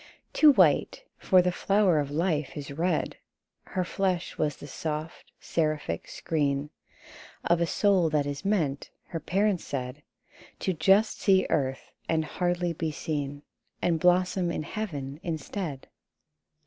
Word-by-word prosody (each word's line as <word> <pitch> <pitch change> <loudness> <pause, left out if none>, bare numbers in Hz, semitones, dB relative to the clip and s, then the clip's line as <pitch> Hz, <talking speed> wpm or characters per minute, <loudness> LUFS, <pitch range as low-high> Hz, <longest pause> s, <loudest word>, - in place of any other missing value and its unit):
Too 305 -1 +7
white, - - +3 0.2
for 185 -1 +4
the 180 - +1
flower 195 -2 +2
of 145 -1 -2
life 155 -2 -1
is 140 -1 -6
red: 170 +6 -1 0.5
Her 185 -3 -2
flesh 185 -1 -1
was 150 -2 0
the - - -11
soft 155 +2 -5
seraphic 155 - -2
screen 145 -2 -1 0.7
Of 170 0 +2
a 170 - +2
soul 190 -3 +3
that 150 -2 +1
is 140 -1 -4
meant 160 -9 0 0.2
(her 165 - -3
parents 195 +2 0
said) 130 +1 -5 0.6
To 190 - 0
just 195 +7 +3
see 190 -2 +4
earth, 135 -1 -1 0.2
and 160 -1 +1
hardly 175 +1 -1
be 160 0 -2
seen, 145 -1 -4 0.4
And 170 -2 +1
blossom 180 +1 +3
in 170 - -2
heaven 145 -8 -5
instead. 160 -2 -4
165 Hz, 135 wpm, -28 LUFS, 145-185 Hz, 0.7 s, Too